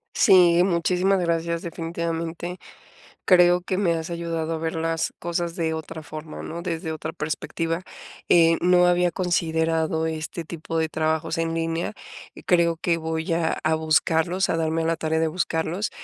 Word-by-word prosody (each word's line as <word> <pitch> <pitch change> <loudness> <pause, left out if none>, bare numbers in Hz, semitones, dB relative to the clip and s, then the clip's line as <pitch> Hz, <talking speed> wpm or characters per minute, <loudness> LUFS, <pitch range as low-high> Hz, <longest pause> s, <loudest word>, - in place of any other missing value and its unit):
Sí, 175 -2 +6
muchísimas 185 +2 +2
gracias. 170 -1 -1
Definitivamente, 170 +1 -4 0.7
creo 180 -1 +5
que 185 +1 -2
me 185 -4 +2
has 165 0 -4
ayudado 165 -1 -3
a 160 - -2
ver 160 0 -3
las 165 0 -1
cosas 170 0 -3
de 165 -3 -1
otra 160 0 -6
forma, 155 +1 -8
¿no?, 170 +1 -6
desde 165 -2 -3
otra 155 - -5
perspectiva. 165 +2 -3 0.5
Eh, 165 -1 +5
no 180 0 +5
había 175 0 +3
considerado 160 -2 0
este 160 +1 -4
tipo 165 0 -5
de 160 -1 0
trabajos 160 +1 -1
en 165 0 -1
línea, 165 +3 -2 0.5
creo 170 -2 +3
que 170 0 0
voy 160 0 -3
a 165 -1 0
a 160 0 +2
buscarlos, 160 +3 +1
a 165 - +1
darme 160 0 0
a - - -2
la 165 -1 0
tarea 160 0 0
de 160 - +2
buscarlos. 170 +3 -1
165 Hz, 160 wpm, -24 LUFS, 160-175 Hz, 0.7 s, Sí